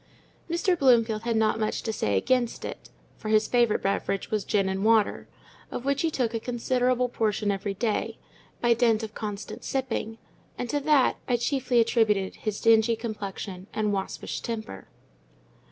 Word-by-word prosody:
Mr. 350 +2 +2
Bloomfield 235 -7 +3
had 235 -1 0
not 220 0 +2
much 215 -1 -1
to 220 - -2
say 100 - 0
against 240 - 0
it, - - -8 0.3
for 215 - -5
his 215 0 +3
favourite 240 -3 +2
beverage 195 0 -1
was 215 -2 0
gin 195 -1 +1
and 190 +1 -2
water; 220 -1 +2 0.4
of 245 - -6
which 280 0 +1
he 330 - +2
took 245 -6 -1
a 225 - -1
considerable 250 +1 0
portion 215 -3 0
every 195 0 -3
day, 215 +1 -1 0.4
by 240 -1 +4
dint 230 -2 +2
of 220 -1 -6
constant 210 -2 -6
sipping—and 245 -2 -5
to 290 - +1
that 290 -2 +3
I 245 - +3
chiefly 255 -1 +1
attributed 220 -4 +2
his 215 -2 -3
dingy 225 0 +4
complexion 200 -4 -6
and 210 -1 0
waspish 195 -1 -4
temper. 220 - -6
225 Hz, 160 wpm, -27 LUFS, 210-245 Hz, 0.4 s, by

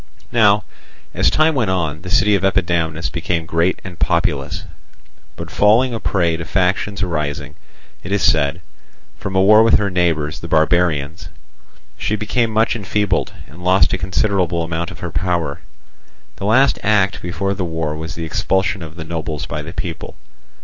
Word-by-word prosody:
Now, 105 -3 +4 0.5
as - - +3
time 155 +1 +3
went 120 -8 0
on, 80 -4 -1
the 90 - -8
city 105 +3 +3
of 100 - +2
Epidamnus 85 -4 0
became 85 -1 -2
great 85 +3 0
and 90 -3 -9
populous; 70 -5 0 0.7
but - - -8
falling 115 +5 +3
a 115 - -3
prey 85 -6 +1
to 85 - -5
factions 95 +2 0
arising, 75 -4 -3 0.5
it 95 - -8
is 100 -1 +1
said, 80 +2 +2 0.6
from 95 -1 -5
a 95 - +4
war 105 +2 +7
with 115 0 +5
her 100 -2 -1
neighbours 80 -4 0
the 85 - -7
barbarians, 80 -2 +1 0.7
she 105 - 0
became 110 +3 0
much 110 +1 +1
enfeebled, 105 -3 -1
and 85 +5 -14
lost 95 +2 +3
a - - 0
considerable 90 -1 0
amount 85 0 -3
of - - -11
her 90 - -4
power. 85 -3 -1 0.8
The 100 - -5
last 130 +6 +4
act 100 -2 +2
before 90 +3 -2
the 95 - -3
war 80 -3 -3
was 80 +1 -6
the 80 - -4
expulsion 95 +4 0
of 80 -1 -9
the 80 - -6
nobles 80 -3 -4
by 75 - -4
the 80 +2 -8
people. 85 -1 -6
90 Hz, 170 wpm, -19 LUFS, 80-100 Hz, 0.8 s, war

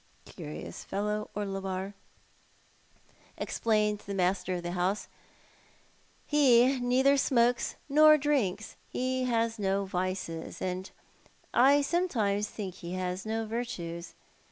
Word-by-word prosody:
" - - -34
Curious 75 +3 -8
fellow, 210 +1 -2
Orlebar," 195 -1 -3 1.4
explained 210 -2 0
the 200 -1 -6
master 185 0 0
of 175 - -5
the 175 - -3
house; 185 +3 -1 1.2
"he 260 -3 +5
neither 260 +3 +3
smokes 245 -3 +2
nor 305 +1 +7
drinks. 245 -9 -1
He 255 0 -1
has 230 -2 0
no 195 0 0
vices; 185 -3 -3
and 185 +1 -3 0.6
I 280 +3 +5
some 345 +5 +1
times 205 -5 0
think 195 -4 -6
he 175 0 -8
has 185 +2 -3
no 225 0 -1
virtues. 185 -7 -5
210 Hz, 115 wpm, -30 LUFS, 185-245 Hz, 1.4 s, nor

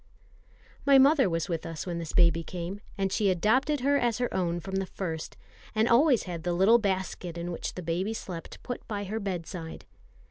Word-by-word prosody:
My 280 -1 +6
mother 270 -4 +5
was 165 -1 -1
with 165 -3 -2
us 165 -2 -5
when 175 -2 -3
this 165 -2 -5
baby 170 -1 +4
came; 180 +4 -6 0.2
and 195 -1 0
she 205 -2 +2
adopted 250 - +2
her 280 +2 +3
as 235 -2 +1
her 245 -1 -1
own 175 -2 0
from 190 +2 -4
the 195 -1 -1
first, 165 -5 -5 0.4
and 220 +1 +3
always 250 +1 +5
had 175 -3 -5
the 175 +1 -1
little 195 +7 +5
basket 190 -4 -2
in 170 +1 -4
which 170 - -5
the 180 - -6
baby 180 +7 -1
slept 175 -6 -7
put 245 - -6
by 205 -2 -3
her 210 +3 -3
bedside. 175 -4 -5
190 Hz, 200 wpm, -28 LUFS, 170-225 Hz, 0.4 s, My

